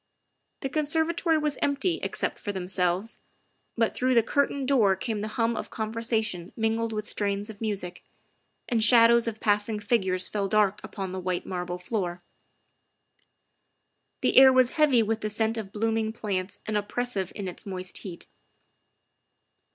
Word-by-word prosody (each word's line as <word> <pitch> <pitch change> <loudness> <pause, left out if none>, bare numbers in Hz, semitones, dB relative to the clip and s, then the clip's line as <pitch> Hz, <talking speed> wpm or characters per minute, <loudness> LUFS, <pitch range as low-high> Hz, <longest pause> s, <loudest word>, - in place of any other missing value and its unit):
The 270 - -2
conserva 320 +3 0
tory 330 -2 +2
was 300 -2 -1
empty, 285 +5 +1
except - - -2
for 205 - -3
themselves, 185 +2 -1 0.6
but 230 -1 +2
through 255 0 +1
the 230 - +5
curtained 280 +2 0
door 225 -9 +4
came 210 +2 -3
the 215 - -3
hum 230 0 +1
of - - -5
conversation 220 -5 -2
mingled 225 0 0
with 215 -1 -4
strains 205 +1 -2
of 205 - -16
music, 200 -5 -3 0.6
and 230 -3 +2
shadows 235 0 +6
of 220 -1 -3
passing 210 +1 +1
figures 190 -4 0
fell 200 -2 -2
dark 210 0 +2
upon 195 -3 -5
the 185 - -4
white 180 -1 -2
marble 180 -1 -4
floor; 180 -2 -3 2.0
the - - +1
air 265 0 +10
was 255 -1 +4
heavy 285 -7 +4
with 220 +1 -1
the 215 - -2
scent 220 +1 0
of 215 -4 -5
blooming 220 +1 0
plants 195 -4 -4
and 215 -1 -1
oppressive 205 -2 -2
in 200 -2 -4
its 180 +4 -7
moist 185 -1 -5
heat. 180 -4 -8
220 Hz, 155 wpm, -27 LUFS, 195-235 Hz, 2.0 s, air